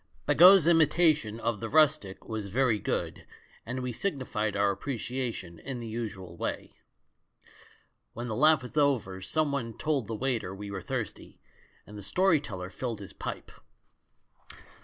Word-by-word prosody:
Bagot's 185 Hz, 0 st, +8 dB
imitation 155 Hz, -8 st, +3 dB
of 115 Hz, -3 st, -1 dB
the 115 Hz, -, -4 dB
rustic 140 Hz, -11 st, +2 dB
was 110 Hz, -3 st, -4 dB
very 120 Hz, 0 st, +2 dB
good, -, -, -3 dB, 0.4 s
and 125 Hz, +2 st, -3 dB
we 125 Hz, 0 st, -3 dB
signified 120 Hz, -, -2 dB
our 100 Hz, 0 st, +3 dB
appreciation 120 Hz, -, -4 dB
in 135 Hz, -3 st, -6 dB
the 120 Hz, -, -6 dB
usual 105 Hz, -6 st, -6 dB
way. -, -, -4 dB, 1.4 s
When 120 Hz, -, -5 dB
the 110 Hz, -3 st, -3 dB
laugh 155 Hz, +2 st, +4 dB
was 125 Hz, -, -10 dB
over 125 Hz, -11 st, +1 dB
someone 140 Hz, 0 st, -1 dB
told 145 Hz, -8 st, -1 dB
the 115 Hz, -, -3 dB
waiter 115 Hz, -6 st, -2 dB
we 100 Hz, +1 st, -7 dB
were 100 Hz, -1 st, -5 dB
thirsty, -, -, -5 dB, 0.5 s
and 105 Hz, 0 st, -10 dB
the -, -, -8 dB
story 180 Hz, -, +2 dB
teller 95 Hz, -9 st, -7 dB
filled 120 Hz, -2 st, -4 dB
his 100 Hz, -, -9 dB
pipe. -, -, -6 dB
120 Hz, 145 wpm, -29 LUFS, 105-140 Hz, 1.4 s, Bagot's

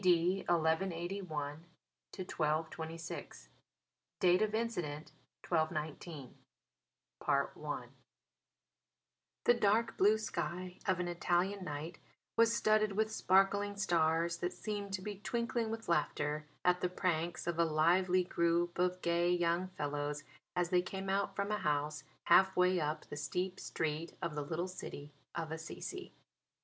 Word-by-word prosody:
D. 180 Hz, 0 st, +4 dB
1181 175 Hz, +3 st, +1 dB
1226 160 Hz, -, -4 dB, 0.7 s
(Date 180 Hz, +2 st, +5 dB
of 215 Hz, 0 st, +1 dB
Incident, 175 Hz, -10 st, -2 dB, 0.4 s
1219) 155 Hz, -3 st, -2 dB, 0.9 s
I -, -, 0 dB, 1.6 s
The 240 Hz, -, +6 dB
dark 225 Hz, 0 st, +2 dB
blue 210 Hz, +3 st, +6 dB
sky 180 Hz, -3 st, -4 dB
of 185 Hz, -2 st, +2 dB
an 180 Hz, -, -1 dB
Italian 175 Hz, +3 st, 0 dB
night 155 Hz, +1 st, -5 dB, 0.4 s
was 230 Hz, 0 st, +5 dB
studded 215 Hz, -2 st, +3 dB
with 220 Hz, +2 st, +1 dB
sparkling 200 Hz, 0 st, +3 dB
stars 170 Hz, -3 st, +2 dB
that 175 Hz, +1 st, -2 dB
seemed 205 Hz, +1 st, -4 dB
to 190 Hz, -1 st, -2 dB
be 205 Hz, -1 st, -5 dB
twinkling 235 Hz, +1 st, -1 dB
with 225 Hz, 0 st, -5 dB
laughter 150 Hz, -2 st, 0 dB, 0.2 s
at 180 Hz, 0 st, +4 dB
the 180 Hz, -, +1 dB
pranks 175 Hz, -2 st, -1 dB
of 170 Hz, -1 st, -1 dB
a -, -, +6 dB
lively 175 Hz, +4 st, +3 dB
group 170 Hz, 0 st, +1 dB
of 180 Hz, 0 st, +1 dB
gay 170 Hz, 0 st, +2 dB
young 175 Hz, +1 st, +2 dB
fellows 145 Hz, -4 st, -3 dB, 0.3 s
as 175 Hz, -1 st, 0 dB
they 180 Hz, -1 st, +5 dB
came 190 Hz, +1 st, -4 dB
out 200 Hz, +1 st, 0 dB
from 200 Hz, +1 st, -1 dB
a 210 Hz, -, 0 dB
house 150 Hz, -3 st, 0 dB, 0.2 s
half 190 Hz, +2 st, +6 dB
way 180 Hz, 0 st, +4 dB
up 155 Hz, 0 st, -2 dB
the -, -, -7 dB
steep 180 Hz, +6 st, -2 dB
street 160 Hz, +1 st, -3 dB
of 170 Hz, -2 st, -3 dB
the 150 Hz, -, -2 dB
little 165 Hz, +5 st, -2 dB
city 145 Hz, -5 st, -8 dB, 0.2 s
of 165 Hz, -2 st, -3 dB
Assisi. 165 Hz, -, -6 dB
175 Hz, 130 wpm, -35 LUFS, 160-195 Hz, 1.6 s, The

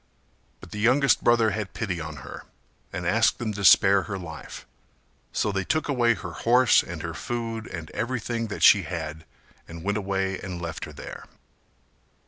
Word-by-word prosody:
But -, -, -13 dB
the 105 Hz, -, -6 dB
youngest 130 Hz, +5 st, +3 dB
brother 115 Hz, -2 st, +4 dB
had 105 Hz, -1 st, -4 dB
pity 90 Hz, -7 st, -3 dB
on 80 Hz, 0 st, -6 dB
her -, -, -9 dB, 0.5 s
and 90 Hz, -, -5 dB
asked 110 Hz, +6 st, +3 dB
them 110 Hz, -3 st, -3 dB
to 100 Hz, 0 st, -5 dB
spare 95 Hz, +2 st, +6 dB
her 100 Hz, -, -3 dB
life, 80 Hz, -4 st, -9 dB, 0.7 s
so 105 Hz, -, 0 dB
they 95 Hz, -1 st, -1 dB
took 155 Hz, +10 st, -1 dB
away 120 Hz, -5 st, +2 dB
her -, -, -7 dB
horse 125 Hz, +1 st, +4 dB
and 85 Hz, -2 st, -7 dB
her 85 Hz, -1 st, -4 dB
food 115 Hz, +1 st, -4 dB
and 85 Hz, -3 st, -7 dB
everything 115 Hz, -1 st, -2 dB
that 105 Hz, -, -5 dB
she 100 Hz, -, +8 dB
had 80 Hz, -3 st, -6 dB, 0.4 s
and 85 Hz, 0 st, -9 dB
went 100 Hz, +2 st, 0 dB
away 95 Hz, -1 st, -2 dB
and 90 Hz, -2 st, -6 dB
left 85 Hz, -1 st, -5 dB
her -, -, -10 dB
there. -, -, -9 dB
100 Hz, 175 wpm, -25 LUFS, 85-115 Hz, 0.7 s, she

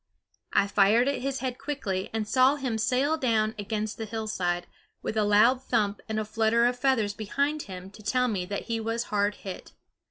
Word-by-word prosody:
I 200 Hz, -, +3 dB
fired 205 Hz, +5 st, +4 dB
at 280 Hz, -, 0 dB
his 270 Hz, 0 st, -2 dB
head 255 Hz, -1 st, -3 dB
quickly, 270 Hz, -10 st, -3 dB
and 220 Hz, -1 st, -2 dB
saw 260 Hz, +4 st, +4 dB
him 255 Hz, -6 st, -2 dB
sail 270 Hz, +7 st, +2 dB
down 220 Hz, -5 st, +1 dB
against 210 Hz, +1 st, -3 dB
the 225 Hz, -, -3 dB
hillside, 210 Hz, -5 st, -2 dB, 0.4 s
with -, -, -3 dB
a 215 Hz, -, +2 dB
loud 215 Hz, +5 st, +4 dB
thump 210 Hz, -5 st, 0 dB
and 215 Hz, 0 st, -1 dB
a 215 Hz, -, -2 dB
flutter 225 Hz, +2 st, +2 dB
of 245 Hz, 0 st, +1 dB
feathers 250 Hz, -6 st, +2 dB
behind 280 Hz, +9 st, -1 dB
him 185 Hz, 0 st, -8 dB
to 215 Hz, -, -14 dB
tell 250 Hz, +4 st, +1 dB
me 200 Hz, -6 st, -1 dB
that 200 Hz, 0 st, -3 dB
he 230 Hz, -1 st, -2 dB
was 225 Hz, +1 st, -1 dB
hard 205 Hz, 0 st, +2 dB
hit. 190 Hz, -2 st, -8 dB
220 Hz, 195 wpm, -27 LUFS, 205-255 Hz, 0.4 s, fired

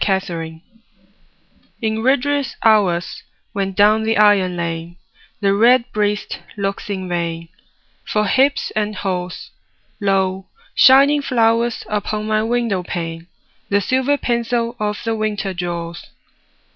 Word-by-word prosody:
XVII—WINTER 170 Hz, -5 st, -2 dB, 1.2 s
In 220 Hz, 0 st, 0 dB
rigorous 275 Hz, +2 st, +1 dB
hours, 195 Hz, -6 st, +2 dB, 0.3 s
when 195 Hz, -1 st, -1 dB
down 210 Hz, +3 st, +4 dB
the 220 Hz, 0 st, 0 dB
iron 200 Hz, -4 st, +4 dB
lane 170 Hz, 0 st, -4 dB, 0.5 s
The 195 Hz, -1 st, +3 dB
redbreast 220 Hz, -2 st, +2 dB, 0.2 s
looks 200 Hz, 0 st, -3 dB
in 190 Hz, -2 st, -3 dB
vain 170 Hz, -1 st, -3 dB, 0.5 s
For 210 Hz, 0 st, 0 dB
hips 270 Hz, +7 st, +2 dB
and 215 Hz, 0 st, -1 dB
haws, 180 Hz, -3 st, -4 dB, 0.5 s
Lo, 190 Hz, -2 st, 0 dB, 0.3 s
shining 280 Hz, +2 st, +6 dB
flowers 235 Hz, -2 st, +1 dB
upon 210 Hz, 0 st, -2 dB
my 215 Hz, 0 st, +1 dB
window 230 Hz, -4 st, 0 dB
pane 165 Hz, -1 st, -5 dB, 0.4 s
The 200 Hz, -, +3 dB
silver 260 Hz, +7 st, +1 dB
pencil 235 Hz, -1 st, -1 dB
of 210 Hz, 0 st, -1 dB
the 225 Hz, -1 st, -1 dB
winter 210 Hz, -3 st, -2 dB
draws. 170 Hz, -2 st, -5 dB
210 Hz, 115 wpm, -19 LUFS, 185-230 Hz, 1.2 s, shining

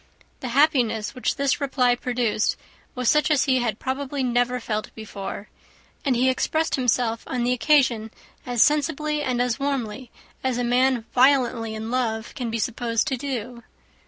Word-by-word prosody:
The 260 Hz, -, -5 dB
happiness 245 Hz, -8 st, +2 dB
which 255 Hz, -, -1 dB
this 280 Hz, 0 st, 0 dB
reply 260 Hz, -3 st, +2 dB
produced 245 Hz, -3 st, 0 dB, 0.4 s
was 250 Hz, -1 st, -2 dB
such 300 Hz, 0 st, +4 dB
as 295 Hz, -3 st, +3 dB
he 260 Hz, -2 st, +2 dB
had 230 Hz, -4 st, -1 dB
probably 270 Hz, +2 st, -3 dB
never 245 Hz, 0 st, +1 dB
felt 215 Hz, -2 st, -3 dB
before; 205 Hz, -1 st, -7 dB, 0.6 s
and 270 Hz, -4 st, +1 dB
he 250 Hz, +2 st, +2 dB
expressed 315 Hz, +5 st, 0 dB
himself 240 Hz, -3 st, +1 dB
on 250 Hz, -2 st, -2 dB
the 245 Hz, +1 st, +2 dB
occasion 250 Hz, -4 st, +2 dB, 0.3 s
as 245 Hz, -2 st, +3 dB
sensibly 300 Hz, +1 st, +1 dB
and 255 Hz, -4 st, -1 dB
as 245 Hz, +1 st, 0 dB
warmly 260 Hz, -3 st, -3 dB, 0.3 s
as 260 Hz, -2 st, 0 dB
a 245 Hz, -, 0 dB
man 245 Hz, -1 st, +2 dB
violently 245 Hz, -4 st, +3 dB
in 220 Hz, +1 st, -5 dB
love 230 Hz, -3 st, -1 dB
can 250 Hz, -5 st, -4 dB
be 225 Hz, -, -2 dB
supposed 230 Hz, 0 st, -1 dB
to 265 Hz, -, 0 dB
do. 245 Hz, -3 st, -5 dB
250 Hz, 160 wpm, -24 LUFS, 230-270 Hz, 0.6 s, such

